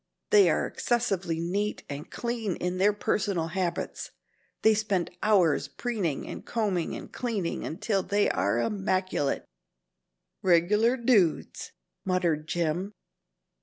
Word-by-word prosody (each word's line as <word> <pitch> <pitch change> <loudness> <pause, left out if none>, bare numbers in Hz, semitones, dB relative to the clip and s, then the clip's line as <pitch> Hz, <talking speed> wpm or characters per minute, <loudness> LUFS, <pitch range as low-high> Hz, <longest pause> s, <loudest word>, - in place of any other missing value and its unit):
They 415 -3 +7
are - - +1
excessively 195 -9 -1
neat 200 +5 -2
and 145 +1 -7
clean 235 -6 -2
in 180 +1 -3
their 200 +2 +5
personal 200 -4 -1
habits. 180 0 -3 0.5
They 220 - +6
spend 205 -5 0
hours 190 -8 +3
preening 205 - -3
and - - -7
combing 200 -7 -1
and - - -9
cleaning 215 -8 -2
until 200 +3 -1
they 205 +2 +1
are 100 +4 +1
immaculate 185 - 0 0.5
" - - -56
"Regular 210 +9 +4
dudes," 225 -9 +1 0.3
muttered 170 -5 0
Jim. 175 +4 -1
190 Hz, 120 wpm, -28 LUFS, 170-215 Hz, 0.5 s, They